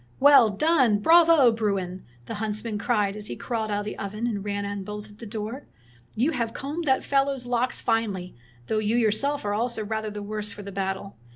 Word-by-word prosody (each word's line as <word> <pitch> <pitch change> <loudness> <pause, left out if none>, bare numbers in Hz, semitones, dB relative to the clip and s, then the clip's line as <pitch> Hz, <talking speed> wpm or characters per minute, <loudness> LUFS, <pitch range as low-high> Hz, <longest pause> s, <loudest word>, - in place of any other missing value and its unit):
"Well 280 -5 +7
done! 255 -1 +3
Bravo, 325 +1 +6
Bruin!" 195 -5 -2 0.2
the - - -6
hunts 215 -1 -2
man 220 -3 -3
cried, 210 -3 +1
as 210 0 -5
he - - -5
crawled 225 -3 -3
out 205 0 0
of - - -7
the 210 - -6
oven 210 +3 -4
and 210 -5 -2
ran 205 0 -2
and 200 -1 -4
bolted 210 +1 -8
the 230 - -8
door. 220 +5 -6 0.2
" 120 0 -30
You 310 - +3
have 235 -5 -2
combed 300 +5 -4
that 265 -2 +2
fellow's 275 -2 +1
locks 245 +1 0
finely, 205 -6 -1 0.3
though 215 - 0
you 215 +2 +1
your 225 -3 +3
seK 280 +4 -1
are 205 - 0
also 225 0 -1
rather 220 0 -3
the 205 0 -6
worse 210 0 -3
for 205 - -9
the 200 - -7
battle. 195 0 -4
215 Hz, 215 wpm, -25 LUFS, 205-245 Hz, 0.3 s, Well